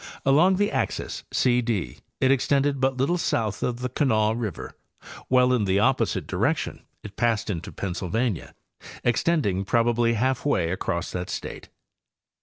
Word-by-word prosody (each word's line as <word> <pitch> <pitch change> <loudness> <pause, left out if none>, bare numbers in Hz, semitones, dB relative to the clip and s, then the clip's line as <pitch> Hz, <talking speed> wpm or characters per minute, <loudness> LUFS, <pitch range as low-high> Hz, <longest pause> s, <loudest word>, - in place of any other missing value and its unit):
Along 160 +8 +5
the 205 +2 +1
axis - - -3
C 125 -1 +2
D 105 - -3 0.2
it 130 - +3
extended 140 +1 +2
but 135 -1 +1
little 170 +7 +1
south 110 -9 -1
of 125 0 -2
the 125 - -2
Kanawha 110 -5 +2
river, 110 -6 -5 0.5
while 125 0 +4
in 115 -5 +1
the 95 0 +2
opposite 105 - +1
direction - - -1 0.2
it 100 -1 -9
passed 115 -3 0
into 85 -3 -5
Pennsylvania, 100 +3 -3 0.5
extending 120 - +1
probably 115 +2 +2
half 130 +3 0
way 95 - +1
across 85 -2 -2
that 90 0 -4
state. - - -6
120 Hz, 145 wpm, -25 LUFS, 100-130 Hz, 0.5 s, Along